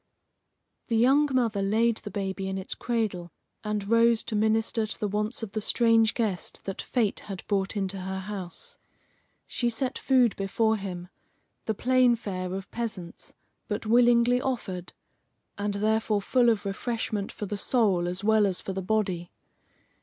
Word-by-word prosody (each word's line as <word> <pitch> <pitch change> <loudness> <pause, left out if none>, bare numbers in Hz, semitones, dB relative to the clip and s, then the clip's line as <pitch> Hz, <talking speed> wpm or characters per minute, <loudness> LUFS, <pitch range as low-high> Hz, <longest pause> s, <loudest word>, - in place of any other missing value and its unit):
The 230 - +1
young 275 +6 +4
mother 230 -6 +1
laid 220 +3 +2
the - - -7
baby 195 -1 -3
in 190 - -3
its 190 - -4
cradle, 210 -8 -2 0.3
and 210 -2 -2
rose 230 0 +4
to 220 - -4
minister 220 +1 +1
to - - -6
the 210 - 0
wants 210 +3 -2
of 215 - -5
the 215 +1 -2
strange 225 0 +3
guest 210 -7 -2
that 195 - -4
fate 225 -5 0
had 195 -3 -8
brought 195 0 -1
into 195 -1 -1
her 190 +1 -4
house. 205 - -5 0.7
She 240 - -1
set 250 +3 -1
food 255 -5 +3
before 220 +3 +1
him, 180 -3 -6 0.6
the 220 - -1
plain 250 +1 +4
fare 185 -5 -4
of 190 +1 -6
peasants, 210 -7 -6 0.3
but 210 +1 -3
willingly 240 +2 +4
offered, 190 -9 -4 0.6
and 205 0 -2
therefore 215 0 +1
full 245 +1 +3
of 220 -3 0
refreshment 210 0 -2
for 210 - -6
the 205 - -4
soul 200 -5 +2
as 180 +3 -3
well 215 -1 +4
as 185 -2 0
for 190 - -5
the 190 - -3
body. 185 -4 -1
215 Hz, 160 wpm, -27 LUFS, 195-230 Hz, 0.7 s, young